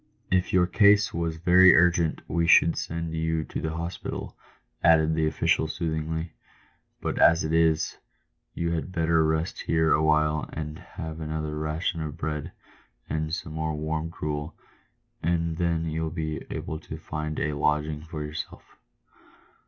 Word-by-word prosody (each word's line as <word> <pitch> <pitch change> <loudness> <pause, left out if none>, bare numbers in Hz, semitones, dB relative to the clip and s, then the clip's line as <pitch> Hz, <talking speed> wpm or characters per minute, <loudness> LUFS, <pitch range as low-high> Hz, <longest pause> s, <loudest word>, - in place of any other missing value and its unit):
" - - -40
If 90 -1 +2
your 90 -1 +4
case 100 +3 +4
was 85 -1 -2
very 90 +2 +7
urgent 85 -1 +3
we 85 -1 0
should 85 -1 +6
send 85 0 -4
you 80 0 -1
to - - -5
the 80 +1 -3
hospital," 85 +1 -5 0.5
added 80 -1 +5
the 80 0 +1
official, 80 - +1
soothingly; 80 0 -3 0.3
" - - -41
but - - -2
as 85 +2 +5
it 80 +1 -2
is, 80 -1 +2 0.6
you 85 0 -1
had 85 +2 -3
better 80 -2 +2
rest 80 +1 -1
here 80 -1 +2
awhile 75 0 +2
and 75 +1 -5
have 80 -3 -8
another 75 -1 -3
ration 80 +2 -2
of 75 0 -5
bread 75 -2 -3 0.6
and 80 0 -1
some 80 -1 -4
more 80 0 -2
warm 80 +1 -2
gruel, 75 -1 -4 0.7
and 85 0 0
then 85 -2 0
you'll 80 0 -2
be 80 -1 -4
able 80 - -4
to - - -8
find 75 0 -4
a 75 - -1
lodging 75 +1 0
for 80 -1 -6
yourself." 75 0 -6
80 Hz, 155 wpm, -26 LUFS, 75-85 Hz, 0.7 s, very